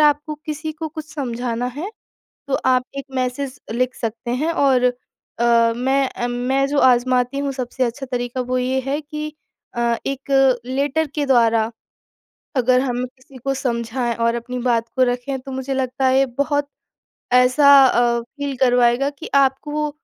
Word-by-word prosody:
आपको 300 0 +2
किसी 310 +1 -4
को 315 +1 -5
कुछ 310 0 -9
समझाना 245 -3 -2
है 370 +8 -4 0.6
तो 270 - 0
आप 255 -1 +3
एक 275 - -5
मैसेज़ 255 +2 -2
लिख 255 +2 0
सकते 235 +1 -4
हैं। 335 +1 +1
और 270 -5 +3 0.5
अ, 235 -1 +4
मैं 265 +2 +1
अ, 240 - -3
मैं 255 +3 0
जो 290 0 0
आज़माती 250 +1 +3
हूँ 280 -1 -1
सबसे 255 0 -2
अच्छा 265 +3 -4
तरीका 245 0 -3
वो 255 +1 -1
ये 260 +1 0
है 285 +2 -1
कि 300 0 -6 0.4
अ, 235 -1 +1
एक 270 -2 +2
लेटर 280 +4 0
के 295 -2 0
द्वारा 230 -3 +3 0.9
अगर 255 0 +4
हम 250 -1 -1
किसी 255 +1 -13
को 275 0 0
समझाएँ 235 -2 -2
और 230 0 +1
अपनी 250 +1 -4
बात 235 -2 +1
को 260 - +3
रखें 250 +2 -2
तो 270 +1 -9
मुझे 265 +1 -3
लगता 265 0 -1
है 260 +1 +4
ये 270 - +4
बहुत 285 0 +1 0.7
ऐसा 255 +3 +6
अ, 240 -1 +2
फ़ील 280 +3 -6
करवाएगा 245 +1 +3
कि 280 - -10
आपको 295 +2 +1
260 Hz, 165 wpm, -20 LUFS, 245-280 Hz, 0.9 s, ऐसा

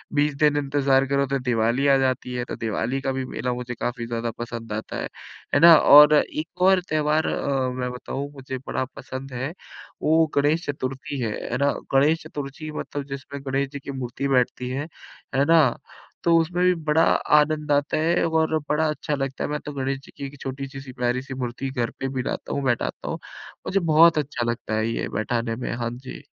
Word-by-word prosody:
20 145 0 +2
दिन 150 -1 +4
इंतजार 135 -1 +2
करो 140 0 +2
तो 135 0 -1
दिवाली 125 +2 +1
आ 135 -1 +6
जाती 130 -1 0
है। 125 - -2
तो - - -3
दिवाली 115 +4 -2
का 135 - -1
भी 130 0 -3
मेला 125 0 -3
मुझे 120 0 -5
काफ़ी 120 -1 -3
ज़्यादा 115 0 -2
पसंद 115 -2 -5
आता 110 +1 -4
है, - - -3 0.5
है - - +5
ना। 170 0 +10
और 150 +1 +8
एक 160 +3 -7
और 190 0 +5
त्यौहार 155 0 +1
अ, 135 -2 0
मैं 125 0 -3
बताऊँ, 135 +3 -5
मुझे 130 -1 -6
बड़ा 130 - -1
पसंद 130 0 -7
है, 130 +5 -3 0.5
वो 160 +1 +4
गणेश 150 +4 +2
चतुर्थी 135 -1 -4
है, 115 -3 -1 0.2
है 125 - 0
ना। 140 +2 +2 0.2
गणेश 150 +4 +4
चतुर्थी 145 +2 -6
मतलब 145 -1 -5
जिसमें 140 0 -7
गणेश 135 +1 0
जी 140 - -6
की 140 - -7
मूर्ति 130 +1 -3
बैठती 125 -1 +1
है, 140 +4 -3 0.5
है 135 +1 +3
ना। 165 +1 +6 0.6
तो 170 -1 +4
उसमें 175 +2 0
भी 180 - +5
बड़ा 155 +2 +4 0.4
आनंद 150 0 0
आता 145 +1 +2
है 165 +3 +2
और 160 -1 +2
बड़ा 155 +1 +2
अच्छा 150 0 -2
लगता 135 -1 -3
है। - - -2
मैं 150 0 -2
तो 150 - -5
गणेश 135 0 -2
जी - - -15
की 140 - -5
एक 140 0 -9
छोटी-सी, 135 +1 -5
सी 135 -1 -10
प्यारी-सी 125 +2 -2
मूर्ति 130 +1 -4
घर 120 -4 -1
पे 135 - -1
भी 130 - 0
लाता - - -4
हूँ, 140 - -2
बैठाता 120 -3 -1
हूँ। - - -3 0.5
मुझे 195 - +2
बहुत 165 -1 +5
अच्छा 140 -5 -1
लगता 115 -2 -5
है 110 +1 +1
ये 115 - -2
बैठाने 115 +1 -1
में। 125 - -4
हाँ 120 -1 -2
जी। 130 +1 -10
135 Hz, 205 wpm, -24 LUFS, 125-150 Hz, 0.6 s, ना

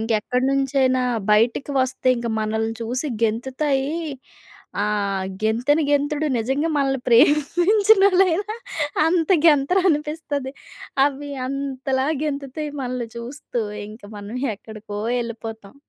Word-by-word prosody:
ఇంక 225 +1 -4
ఎక్కడినుంచైనా 260 +1 +1 0.3
బయటికి 230 +6 +2
వస్తే 260 0 0
ఇంక 235 - -3
మనల్ని 220 +1 -1
చూసి 250 +6 -2 0.2
గెంతుతాయి, 265 +5 0 0.9
ఆహ్, 200 -2 -1 0.2
గెంతెని 245 +8 +2
గెంతుడు 290 +1 +1
నిజంగా 270 +8 0
మనల్ని 270 -2 +1
ప్రేమించినోళ్ళైనా 385 - +4 0.5
అంత 330 0 +1 0.2
గెంతరనిపిస్తది. 300 -3 +1 0.5
అవి 285 0 -4 0.2
అంతలా 270 -1 -2 0.2
గెంతుతాయి 285 +1 -4
మనల్ని 250 -2 -3
చూస్తూ. 245 -1 -5 0.3
ఇంకా 215 -1 -12
మనం 205 +4 -7 0.2
ఎక్కడికో 210 -1 -9 0.2
ఎళ్ళిపోతాం. 225 -2 -7
270 Hz, 95 wpm, -22 LUFS, 230-295 Hz, 0.9 s, ప్రేమించినోళ్ళైనా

